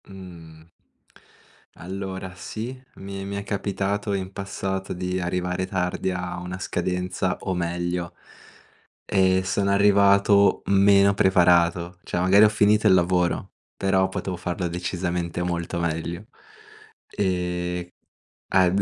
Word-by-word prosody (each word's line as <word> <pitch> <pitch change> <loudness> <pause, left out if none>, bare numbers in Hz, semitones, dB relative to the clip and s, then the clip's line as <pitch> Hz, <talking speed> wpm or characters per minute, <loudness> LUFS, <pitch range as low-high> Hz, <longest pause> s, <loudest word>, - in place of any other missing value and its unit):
Uhm. 85 -4 -13 1.0
Allora 95 +1 -6
sì, 115 +6 -6 0.2
mi 95 0 -7
mi 100 +1 -5
è 100 - -4
capitato 100 0 -2
in 95 -1 -3
passato 95 -1 -4
di 90 +1 -2
arrivare 90 +1 -2
tardi 95 0 -1
a 90 -1 -4
una 90 +1 -6
scadenza 90 0 -2
o 95 - -2
meglio 85 0 -2 0.9
e 95 -1 +2
sono 100 +1 0
arrivato 100 0 +4
meno 100 0 +5
preparato, 85 -2 +3
cioè 90 - -2
magari 95 +3 +6
ho - - +7
finito 105 0 +3
il - - +6
lavoro, 90 +1 +1 0.2
però 95 -1 +2
potevo 95 -1 -4
farla 90 0 -3
decisamente 90 0 -3
molto 85 0 -3
meglio. 85 +3 -3 0.9
Ehm, 90 -2 -2 0.6
ad 95 +1 +3
95 Hz, 115 wpm, -24 LUFS, 90-100 Hz, 1.0 s, ho